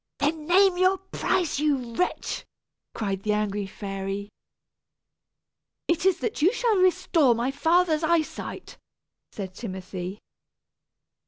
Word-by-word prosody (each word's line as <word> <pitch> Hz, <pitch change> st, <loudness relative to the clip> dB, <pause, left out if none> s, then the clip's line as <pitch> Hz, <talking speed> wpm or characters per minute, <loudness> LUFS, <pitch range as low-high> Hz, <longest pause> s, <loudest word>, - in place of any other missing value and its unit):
"Then 305 Hz, +1 st, -1 dB
name 375 Hz, +1 st, +5 dB
your 370 Hz, +1 st, +4 dB
price, 365 Hz, -4 st, -1 dB
you 275 Hz, -6 st, 0 dB
wretch!" 360 Hz, +9 st, -2 dB, 0.5 s
cried 195 Hz, -3 st, -2 dB
the 210 Hz, +1 st, 0 dB
angry 205 Hz, -1 st, -1 dB
fairy. 195 Hz, 0 st, -5 dB, 1.6 s
"It 340 Hz, +2 st, +2 dB
is 375 Hz, -2 st, +3 dB
that 435 Hz, -, -2 dB
you 350 Hz, +6 st, +5 dB
shall 465 Hz, -3 st, +1 dB
restore 335 Hz, -7 st, +3 dB
my 240 Hz, +3 st, -1 dB
father's 325 Hz, +2 st, +2 dB
eye 330 Hz, 0 st, +3 dB
sight," -, -, -8 dB, 0.5 s
said 190 Hz, -3 st, -6 dB
Timothy. 185 Hz, -2 st, -6 dB
290 Hz, 115 wpm, -26 LUFS, -, 1.6 s, name